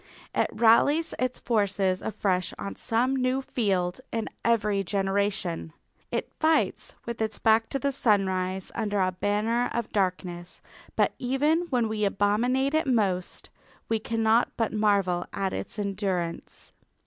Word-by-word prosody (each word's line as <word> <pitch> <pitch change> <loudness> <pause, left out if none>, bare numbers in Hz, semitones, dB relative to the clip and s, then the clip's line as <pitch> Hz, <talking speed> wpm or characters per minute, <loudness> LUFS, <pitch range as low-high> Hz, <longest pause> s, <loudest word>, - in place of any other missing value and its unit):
It - - +1
rallies 285 +8 +4
its 255 0 -1
forces 200 -4 0
afresh 190 -4 -1
on 200 - -5
some 250 +3 0
new 255 0 +1
field 195 -6 -1
in 225 -1 -2
every 210 -3 +2
generation. 195 -3 -1 0.4
It - - -3
fights 315 0 +1
with 235 -1 -5
its 220 -1 -1
back 225 0 +3
to 275 - -1
the 280 +1 0
sunrise 190 -6 0
under 205 -1 -1
a 185 -1 +2
banner 210 +6 0
of 235 -2 -2
darkness, 180 -3 -2 0.4
but - - +2
even 295 +7 +1
when 245 -5 +1
we 215 -1 -2
abominate 230 +8 +1
it 315 -1 +1
most 195 -8 0 0.4
we 225 -1 +1
cannot 225 +1 +2
but 225 -2 0
marvel 200 -5 +1
at 195 -1 -1
its - - -4
endurance. 195 -4 -3
210 Hz, 135 wpm, -27 LUFS, 195-240 Hz, 0.4 s, rallies